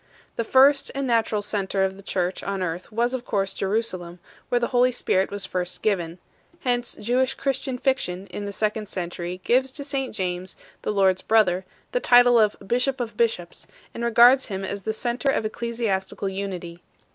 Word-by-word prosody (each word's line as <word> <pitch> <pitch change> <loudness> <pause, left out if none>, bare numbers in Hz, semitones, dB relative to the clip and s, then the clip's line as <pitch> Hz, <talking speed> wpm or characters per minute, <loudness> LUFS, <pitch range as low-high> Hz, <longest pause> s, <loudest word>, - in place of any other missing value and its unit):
The 230 - -1
first 275 +4 +5
and 275 0 -1
natural 225 -4 +1
centre 200 -2 0
of 190 0 -1
the 195 - -12
church 185 -2 -2
on 195 -1 -3
earth 175 +4 -4
was 235 +3 0
of 255 -2 -3
course 195 -4 -1
Jerusalem, 190 -4 -2 0.3
where 245 - +2
the 235 - -1
Holy 250 -1 +3
Spirit 190 -5 +1
was 200 -1 -3
first 180 -1 -4
given; 175 -5 0 0.4
hence 245 -2 0
Jewish 255 +4 0
Christian 270 -1 -2
fiction 220 -9 -1
in 205 - -5
the 200 - -4
second 215 +1 -2
century 175 0 -5
gives 260 +2 +2
to 285 - -5
St 270 -4 -2
James 180 -1 -3 0.2
the - - -2
Lord 190 -2 +3
s - - -7
brother 190 -4 +3 0.3
the - - +1
title 245 - +6
of 215 -1 +3
"bishop 250 +5 0
of 230 -3 -4
bishops 210 -7 -1
2 - - -29
," - - -31
and 235 - -5
regards 240 +3 +6
him 195 -2 -4
as 200 +1 -4
the 220 - -2
centre 240 +4 -1
of 270 - +1
eccle 235 +2 -3
siastical 195 -4 -2
unity. 180 -3 -5
215 Hz, 195 wpm, -24 LUFS, 190-245 Hz, 0.4 s, title